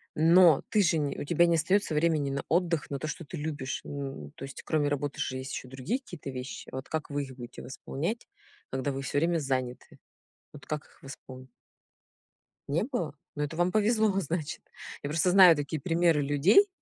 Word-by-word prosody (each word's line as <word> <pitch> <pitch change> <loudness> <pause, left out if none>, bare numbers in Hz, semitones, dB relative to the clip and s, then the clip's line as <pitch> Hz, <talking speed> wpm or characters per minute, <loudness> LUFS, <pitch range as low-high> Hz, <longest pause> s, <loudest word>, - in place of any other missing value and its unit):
но 165 0 +6
ты 210 -2 +3
же 165 -2 +3
не 145 -2 -1
у - - -3
тебя 170 +3 +3
не 170 -1 +3
остается 170 +1 +1
времени 155 -2 +2
на 140 0 -2
отдых, 170 -2 +1
на 140 - -3
то, 155 - -4
что 160 - -5
ты 170 +3 -8
любишь. 145 -3 -4
Н 135 - -6
то - - -10
есть, 135 0 -8
кроме 150 -2 +1
работы, 145 0 -2
же 130 - -2
есть 130 +1 -6
еще 130 - -6
другие 135 - -2
какие-то 175 - -9
вещи. 130 0 -6
Вот 130 0 -6
как 160 -1 -3
вы 145 0 -1
их 135 -2 -9
будете 120 -1 -9
восполнять, 165 - -4 0.4
когда 130 +2 -2
вы 135 0 -4
всё 135 +1 -2
время 170 +2 +2
заняты? 130 -3 -3 0.6
Вот 150 - -13
как 150 0 -4
их - - -25
восполнить? 130 -1 -10 1.2
Не 150 +7 +1
было? 220 - -3 0.2
Ну 150 - -1
это 150 +2 -4
вам 175 +2 +2
повезло, 215 -1 +3
значит. 160 -3 -3 0.4
Я 145 - -3
просто 165 +4 +2
знаю 185 -3 +9
такие 145 +1 -3
примеры 165 -1 +3
людей 145 - +5
150 Hz, 195 wpm, -29 LUFS, 135-175 Hz, 1.2 s, знаю